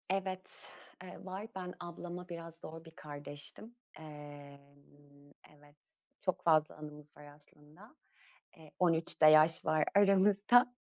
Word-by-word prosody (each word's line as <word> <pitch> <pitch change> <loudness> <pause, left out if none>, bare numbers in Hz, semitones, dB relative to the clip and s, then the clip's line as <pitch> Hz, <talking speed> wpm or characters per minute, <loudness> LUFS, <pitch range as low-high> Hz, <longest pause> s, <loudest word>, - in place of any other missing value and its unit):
Evet, 190 -1 -4 0.3
ııı, 185 0 -11
var. 190 +3 -6
Ben 180 -1 -6
ablama 175 +1 -8
biraz 165 -1 -8
zor 165 0 -11
bir 165 - -13
kardeştim. 145 +9 -10 0.2
Imm, 145 -1 -14 0.2
evet, 145 0 -22 0.4
çok 185 - -2
fazla 155 -2 +3
anımız 150 -1 -12
var 150 - -13
aslında. 150 - -17 0.6
Eee, 160 -3 -16
13 165 -2 +2
de - - +9
yaş 155 +1 +7
var 155 -1 +2
aramızda. 200 +4 +5
160 Hz, 120 wpm, -33 LUFS, 145-185 Hz, 0.6 s, de